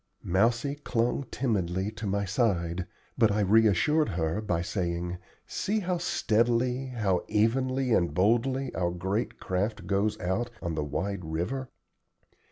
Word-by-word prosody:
Mousie 115 +9 +1
clung 120 +3 0
timidly 95 -5 -1
to 110 -1 -6
my 100 +1 0
side, 90 -5 0 0.3
but 110 -2 +5
I 105 +1 +1
reassured 110 - +4
her 85 +1 -1
by 90 -6 -1
saying: 90 -2 -2 0.3
"See 210 +2 -1
how 180 -2 -1
steadily, 125 -4 +1
how 105 -8 0
evenly 130 +3 +1
and 85 -6 +2
boldly, 120 - +1
our 85 -1 0
great 95 +6 -2
craft 100 +4 -2
goes 105 +2 0
out 105 +5 -1
on 85 -2 -3
the 75 -1 -1
wide 95 +6 -3
river. 90 +12 -3
105 Hz, 135 wpm, -28 LUFS, 90-120 Hz, 0.3 s, but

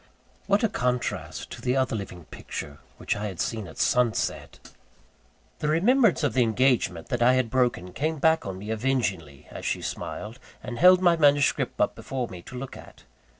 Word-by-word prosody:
What 200 +3 +2
a - - +5
contrast 120 - -3
to - - -8
the 125 +1 0
other 130 -3 +1
living 90 -5 -7
picture 70 -1 -7 0.2
which - - -2
I 105 +1 -3
had 95 -4 -8
seen 110 -1 -2
at 80 - -12
sunset! 125 -4 0 0.9
The 150 - -2
remembrance 205 - +3
of 145 - +1
the 130 - +3
engagement 115 -7 +1
that 120 - -1
I 125 +2 +5
had 130 -3 0
broken 120 -9 0
came 155 +2 -1
back 160 +2 +3
on 95 -2 -5
me 105 +3 -6
avengingly, 105 - -2
as - - -8
she - - -2
smiled, 110 +5 -6 0.2
and 120 -1 -6
held 180 +1 +7
my 175 -2 +5
manuscript 145 -2 +2
up - - +2
before 130 -3 -4
me 90 -2 -9
to 125 +7 -10
look 130 +1 -7
at. - - -14
125 Hz, 185 wpm, -26 LUFS, 100-145 Hz, 0.9 s, held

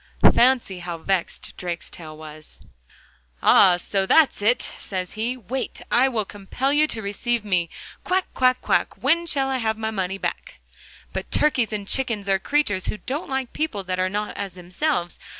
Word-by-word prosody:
Fancy 240 -7 +3
how 175 -1 -5
vexed 185 +1 -2
Drakestail 170 -3 -6
was! 155 0 -11 0.8
'Ah! 180 -2 +7
so 190 +2 -1
that's 315 -5 +4
it,' 235 +4 +2
says 185 -2 -4
he. 230 +4 -2
'Wait! 255 +4 -4
I 260 +2 +5
will 220 -5 -1
compel 205 +8 -2
you 305 +1 +4
to 225 -7 -4
receive 215 +3 -1
me. 180 -4 +1 0.3
Quack, 375 0 +1
quack, 255 0 +3
quack, - - +1
when 340 +1 +3
shall 270 -4 +2
I 260 - 0
get 220 -2 0
my 220 0 -2
money 190 -2 -2
back?' - - -5 0.5
But - - -4
turkeys 255 -7 +2
and 205 -2 -4
chickens 230 -6 -1
are 195 -1 +3
creatures 205 -6 0
who - - -2
don't 275 +8 -4
like 265 -2 -2
people 270 -11 -2
that 185 0 -3
are 185 0 +2
not 210 +2 -3
as 195 -3 -5
themselves. 180 - -2
210 Hz, 170 wpm, -23 LUFS, 185-260 Hz, 0.8 s, Ah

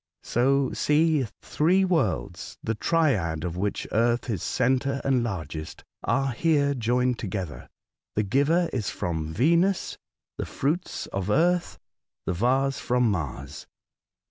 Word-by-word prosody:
So 135 +2 +2
see 150 -3 +2 0.2
three 185 +5 +2
worlds, 105 - -1
the 115 - 0
triad 105 - +1
of 85 -1 -3
which 100 +3 -2
earth 120 +2 +1
is 95 -7 -2
centre 130 +2 +1
and 135 -2 +2
largest, 80 -8 -5 0.2
are 135 -1 +1
here 140 +2 +2
joined 125 0 +1
together. 95 -7 -5 0.5
The 105 - +2
giver 145 - +2
is 115 -6 -1
from 80 -2 -3
Yenus, 170 +8 +2 0.4
the - - -2
fruits 160 +6 -2
of 100 0 -2
Earth, 175 +8 +2 0.5
the - - 0
vase 135 +8 +1
from 125 -2 +2
Mars. 75 -5 -5
125 Hz, 125 wpm, -26 LUFS, 100-145 Hz, 0.5 s, So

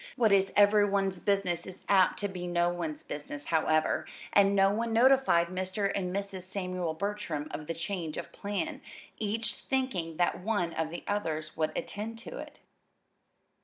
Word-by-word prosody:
What 230 -5 +3
is 195 -1 +4
every 205 0 +6
one's 195 -2 0
business 185 -4 0
is 185 0 -10
apt 190 -2 +4
to 205 - +1
be 180 -2 -5
no 175 0 +2
one's 165 -3 -4
business, 145 0 -6
however, 155 -1 +2 0.3
and 200 0 +5
no 195 0 +5
one 225 +2 -1
notified 240 -8 +5
Mr. 185 +2 -1
and 180 -2 -1
Mrs. 195 -1 -3
Samuel 185 -3 -3
Bertram 170 -5 -3
of 150 +1 -6
the 165 - -2
change 170 -3 -3
of - - -6
plan, 205 0 -3 0.4
each 220 +2 -1
thinking 215 -12 -2
that 175 -1 +1
one 180 -4 -1
of 160 -1 -1
the 170 - -7
others 160 -7 -2
would 155 -1 0
attend 220 +2 -4
to 485 - -8
it. - - -9
190 Hz, 165 wpm, -30 LUFS, 170-205 Hz, 0.4 s, every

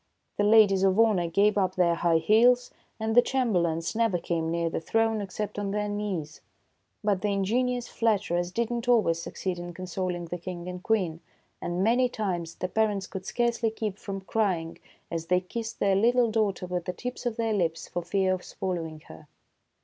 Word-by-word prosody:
The 205 - +2
ladies 205 -2 +6
of 195 +1 +3
honor 210 -7 +4
gave 200 +5 +3
up 185 -1 0
their 175 -2 +3
high 170 0 +2
heels, 240 +8 +4 0.3
and 220 0 -1
the 245 - +8
chamberlains 175 -12 0
never 225 -5 +2
came 165 -1 -2
near 170 0 0
the 165 - -2
throne 225 +4 +1
except 205 +2 -4
on 205 -1 -2
their 210 +1 -1
knees. 200 -7 -4 0.6
But 205 -3 +1
the 210 - 0
ingenious 240 +5 0
flatterers 190 -6 0
did 235 +3 -1
not 240 0 -3
always 200 -9 +3
succeed 180 +1 -4
in 175 0 -7
consoling 180 -1 -3
the 175 +1 -5
King 175 0 -6
and 180 0 -6
Queen, 185 -7 0 0.4
and 175 +2 -1
many 245 +4 +3
times 175 -8 -3
the 185 - -3
parents 205 -1 0
could 190 0 -7
scarcely 235 -1 +1
keep 215 -2 -4
from 195 -1 -5
crying 185 -5 -1 0.3
as 165 -1 -3
they 180 +1 +3
kissed 225 +5 -6
their 195 -1 +3
little 235 +3 +3
daughter 210 -4 0
with 180 -1 -3
the 180 - -3
tips 250 +5 -5
of 230 - -3
their 225 -1 0
lips 165 -5 -1
for 175 - -3
fear 190 +1 +1
of 185 - -4
swallowing 165 -4 -4
her. 155 - -14
195 Hz, 190 wpm, -27 LUFS, 175-220 Hz, 0.6 s, the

